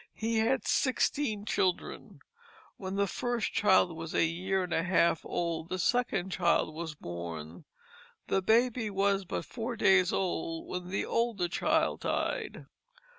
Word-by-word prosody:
He 225 0 0
had 235 +4 +1
sixteen 255 -5 +1
children. 185 -4 -2 0.6
When 190 0 -5
the 200 0 +2
first 240 +4 -2
child 190 -4 +4
was 165 0 -6
a - - +4
year 185 +3 -1
and 180 -1 -4
a - - +2
half 170 -2 +2
old 165 -1 -3
the 185 - -2
second 195 -2 0
child 175 -3 +1
was 160 -1 -5
born. 85 - -7 0.6
The 195 - +1
baby 230 +2 +2
was 195 0 +1
but 180 - -4
four 240 0 -4
days 190 -4 +4
old 165 -3 -2
when 180 0 -5
the 195 - -1
older 230 -6 0
child 315 - +1
died. - - -2
190 Hz, 145 wpm, -30 LUFS, 170-220 Hz, 0.6 s, child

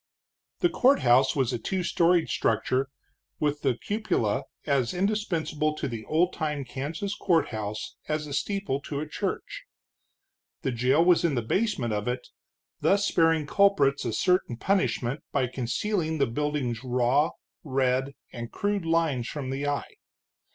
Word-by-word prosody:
The 350 - +4
courthouse 135 - +4
was 130 -3 +1
a 120 - -2
two 185 +10 -2
storied 170 0 +3
structure, 130 +4 +1 0.5
with 150 -1 0
the 130 -4 +1
cupola 205 - -1 0.2
as 140 -1 +1
indispensable 175 -6 0
to - - -3
the 115 -4 -6
old 175 +4 +2
time 150 -4 -2
Kansas 155 +11 -4
courthouse 110 - -1
as 155 0 -1
a 145 - -7
steeple 195 -4 -1
to 140 0 -4
a 155 - -4
church. 470 - -4 1.0
The 135 - 0
jail 130 +7 +3
was 180 -1 +5
in 165 -5 +2
the 120 - 0
basement 130 - 0
of 105 +1 -2
it, 125 0 -3 0.5
thus 200 +1 +3
sparing 165 -4 +3
culprits 150 -6 +3
a 120 - -1
certain 180 - +1
punishment 150 -7 0
by 130 - +1
concealing 155 - -1
the 140 - +3
building's 130 -2 -2
raw, 125 +4 +2 0.3
red, 135 -1 0 0.2
and 120 -1 -6
crude 205 -3 -1
lines 165 -7 +1
from 135 -3 -4
the 140 +2 -2
eye. 145 0 -3
145 Hz, 145 wpm, -27 LUFS, 125-175 Hz, 1.0 s, was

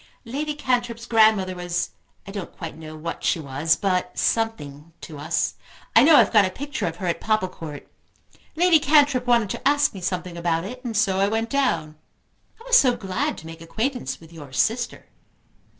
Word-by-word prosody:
"Lady 295 +5 -3
Cantrip's 240 -4 -1
grandmother 215 -5 +4
was, 175 -1 -3 0.3
I 195 - -8
don't 200 -3 -7
quite 165 -2 -6
know 155 0 -10
what 160 +2 -6
she - - +1
was, 150 +3 +1
but 185 0 -1
something 165 -9 -2
to 150 -3 -9
us. 160 +4 -1 0.4
I - - +9
know 310 +2 +7
I've - - +5
got 210 -2 +7
a 185 - +1
picture 285 +6 -4
of 165 - -4
her 185 - -6
at 170 - -1
Popplecourt. 185 -8 -3 0.7
Lady 340 -1 +5
Cantrip 285 -3 +3
wanted 235 -5 +3
to 265 - -2
ask 290 0 +3
me 190 - -8
something 180 -1 -3
about 170 -1 0
it, 250 +6 -8
and 230 -4 -3
so 195 -3 +2
I 195 - +3
went 225 +2 -2
down. 255 - 0 0.6
I - - -14
was - - +6
so 250 -3 +3
glad 190 -2 -2
to 160 - -11
make 165 0 -10
acquaintance 240 +10 -3
with 165 0 -16
your 145 -5 -11
sister." 225 - -1
195 Hz, 185 wpm, -23 LUFS, 165-245 Hz, 0.7 s, I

